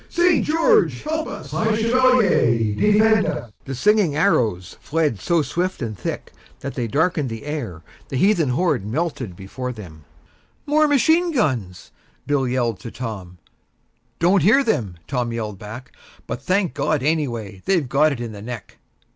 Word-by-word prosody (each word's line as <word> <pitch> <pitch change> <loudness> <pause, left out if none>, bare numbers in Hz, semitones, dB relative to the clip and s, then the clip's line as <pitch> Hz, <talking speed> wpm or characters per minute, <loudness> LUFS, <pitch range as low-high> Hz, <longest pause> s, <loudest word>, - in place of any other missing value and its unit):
St. 345 -2 +3
George 330 +9 +2
help 315 +1 -2
us!" - - -8
"High 220 0 0
Chevalier, 220 - +3
defend 210 - +3
us!" 120 -2 -4
The 135 - -5
singing 200 - +3
arrows 110 - +1
fled 150 -9 0
so 170 - +1
swift 175 +7 -2
and 110 -2 -4
thick 85 - -5 0.3
that 140 - -5
they 120 -3 -2
darkened 150 +2 0
the 115 +1 -7
air, 120 - -5 0.3
the 135 - -2
heathen 175 -3 +3
horde 145 - +1
melted 140 - -2
from 90 - -13
before 125 +8 -6
them. 85 -10 -11 0.6
"More 305 +1 +3
machine 320 +5 +3
guns!" 125 - -2 0.3
Bill 140 -3 +1
yelled 120 -4 -1
to 115 - -8
Tom. 105 -8 -7 0.8
"Don't 180 +3 +3
hear 225 - +5
them," 110 - -1
Tom 125 -3 -2
yelled 110 -4 -4
back. 110 +5 -10 0.3
"But, - - -5
thank 185 -1 0
God, 145 -4 0
anyway; 120 -11 -2
they've 175 -8 +1
got 145 +4 +3
it 135 - -4
in 120 -2 -5
the 105 -2 -9
neck." 115 -1 -8
140 Hz, 160 wpm, -21 LUFS, -, 0.8 s, hear